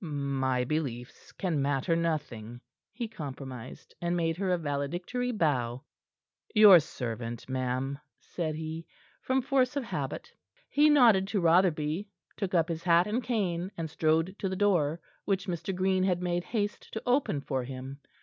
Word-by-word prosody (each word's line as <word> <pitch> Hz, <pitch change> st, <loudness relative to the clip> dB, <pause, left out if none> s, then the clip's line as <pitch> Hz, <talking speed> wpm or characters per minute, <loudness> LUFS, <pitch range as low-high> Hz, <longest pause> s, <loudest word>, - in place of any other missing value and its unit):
"My 135 Hz, -4 st, -1 dB
beliefs 125 Hz, -4 st, -4 dB
can 170 Hz, -7 st, -1 dB
matter 140 Hz, +3 st, +1 dB
nothing," 120 Hz, -9 st, -3 dB, 0.3 s
he 235 Hz, +1 st, -4 dB
compromised, 135 Hz, -, -8 dB
and 175 Hz, 0 st, 0 dB
made 165 Hz, -1 st, 0 dB
her 195 Hz, 0 st, -1 dB
a 180 Hz, -, +3 dB
valedictory 175 Hz, -, -2 dB
bow. 130 Hz, -, 0 dB, 0.7 s
"Your 210 Hz, -4 st, +10 dB
servant, 120 Hz, -5 st, -5 dB
ma'am," 130 Hz, +1 st, -2 dB, 0.2 s
said 160 Hz, -3 st, -4 dB
he, 160 Hz, +1 st, -6 dB, 0.3 s
from 260 Hz, 0 st, +1 dB
force 260 Hz, 0 st, +2 dB
of 280 Hz, -, -1 dB
habit. 235 Hz, -, -5 dB, 0.4 s
He 295 Hz, +1 st, +5 dB
nodded 230 Hz, -10 st, +6 dB
to 205 Hz, 0 st, 0 dB
Rotherby, 170 Hz, 0 st, +2 dB, 0.3 s
took 190 Hz, -3 st, -2 dB
up 165 Hz, -2 st, +3 dB
his 165 Hz, -1 st, -3 dB
hat 170 Hz, 0 st, +4 dB
and 215 Hz, +5 st, -1 dB
cane, 185 Hz, -7 st, -1 dB
and 160 Hz, -2 st, -4 dB
strode 160 Hz, +4 st, +1 dB
to 195 Hz, -, -1 dB
the 190 Hz, -, -2 dB
door, 175 Hz, -6 st, +2 dB, 0.3 s
which 195 Hz, -2 st, 0 dB
Mr. 175 Hz, 0 st, -3 dB
Green 185 Hz, 0 st, +2 dB
had 180 Hz, -2 st, +1 dB
made 175 Hz, -1 st, -1 dB
haste 210 Hz, -3 st, -3 dB
to 220 Hz, -, -4 dB
open 250 Hz, -, +2 dB
for 135 Hz, -2 st, -2 dB
him. 130 Hz, +2 st, -7 dB
165 Hz, 155 wpm, -29 LUFS, 140-195 Hz, 0.7 s, Your